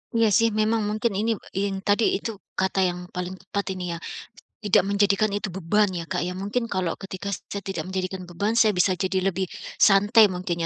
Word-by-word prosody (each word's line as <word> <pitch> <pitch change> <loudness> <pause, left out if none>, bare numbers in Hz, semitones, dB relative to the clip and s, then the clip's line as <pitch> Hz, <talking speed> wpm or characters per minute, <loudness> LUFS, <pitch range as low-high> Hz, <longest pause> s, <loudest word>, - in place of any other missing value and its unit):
Iya 230 -1 +4
sih, 230 0 +4
memang 215 +1 +1
mungkin 215 +2 0
ini 220 +4 +1 0.2
in 195 0 -1
tadi 205 +3 +3 0.2
itu 225 - -4 0.3
kata 190 0 +2
yang 180 -1 0 0.2
paling 180 0 -3
tepat 200 +1 -4
ini 180 -2 -4
ya, - - -5 0.6
tidak 205 -4 +3
menjadikan 200 +1 +2
itu 205 +1 -2
beban 195 +3 +1
ya, 170 - -3
Kak, - - 0
ya. 180 - -4
Mungkin 205 +5 -2
kalau 185 -5 -1
ketika 195 0 -6
saya 200 +1 -6
tidak 185 -3 -4
menjadikan 185 -1 -4
beban, 200 +5 -1
saya 215 -3 +4
bisa 180 +2 +3
jadi 190 0 +1
lebih 190 0 -2 0.3
santai 205 +2 +6
mungkin 180 -2 -3
195 Hz, 190 wpm, -25 LUFS, 185-210 Hz, 0.6 s, santai